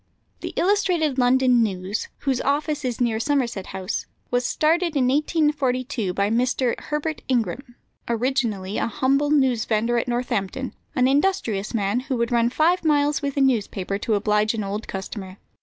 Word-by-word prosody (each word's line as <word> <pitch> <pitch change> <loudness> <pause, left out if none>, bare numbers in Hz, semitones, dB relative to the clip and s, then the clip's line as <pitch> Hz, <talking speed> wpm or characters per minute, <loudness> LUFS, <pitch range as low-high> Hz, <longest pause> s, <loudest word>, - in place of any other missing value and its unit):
The - - -5
Illustrated 350 -8 +1
London 250 -1 +4
News, 195 -1 -2
whose 265 -3 0
office 295 +1 0
is 250 -2 -2
near 235 -3 +1
Somerset 240 -7 -1
House, 190 +1 -4 0.2
was 245 0 +1
started 330 +1 +1
in 260 -3 +3
1842 275 - 0
by 200 +3 0
Mr. 245 +1 +1
Herbert 300 +1 -3
Ingram, 240 +1 -1 0.3
originally 230 -5 -1
a - - 0
humble 275 +5 +1
newsvendor 240 -5 +2
at - - -9
Northampton; 240 0 -2 0.2
an 255 -1 +3
industrious 270 - 0
man, 205 +2 +1
who 260 0 -3
would 235 +1 -1
run 235 0 +3
five 330 +8 +2
miles 295 -2 +2
with 280 -1 -3
a - - +3
newspaper 205 -6 0
to 220 +1 0
oblige 210 +1 +1
an 215 - -2
old 200 +2 -4
customer. 190 -1 -6
250 Hz, 155 wpm, -23 LUFS, 215-285 Hz, 0.3 s, London